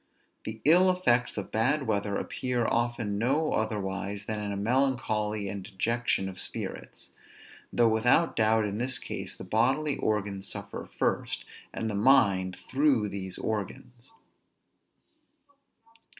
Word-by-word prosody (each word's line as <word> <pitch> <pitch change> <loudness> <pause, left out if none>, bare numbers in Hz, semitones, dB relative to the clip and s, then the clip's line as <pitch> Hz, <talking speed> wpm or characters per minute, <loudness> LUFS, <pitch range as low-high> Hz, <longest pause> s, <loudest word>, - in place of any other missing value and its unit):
The 110 0 -6
ill 180 +5 +6
effects 125 -13 +2
of 100 - -5
bad 130 +6 +1
weather 100 -2 0
appear 125 +1 -1
often 115 -4 0
no 140 +7 +1
otherwise 100 -1 -2
than 110 -1 -3
in 105 -1 -3
a 100 - -3
melancholy 110 -3 0
and 100 0 -4
dejection 110 +1 -1
of 95 -1 -6
spirits; - - -5 0.6
though 120 -1 +4
without 120 +9 +3
doubt, 110 0 +3
in 105 +1 -3
this 125 +1 0
case, - - -5
the - - -9
bodily 135 +6 +1
organs 100 -2 -1
suffer 100 -1 -6
first, - - -1 0.3
and 110 - -3
the 110 - -2
mind 100 -5 +3
through 130 -6 +2
these 95 -1 -6
organs. 115 - -5
110 Hz, 130 wpm, -28 LUFS, 100-125 Hz, 0.6 s, ill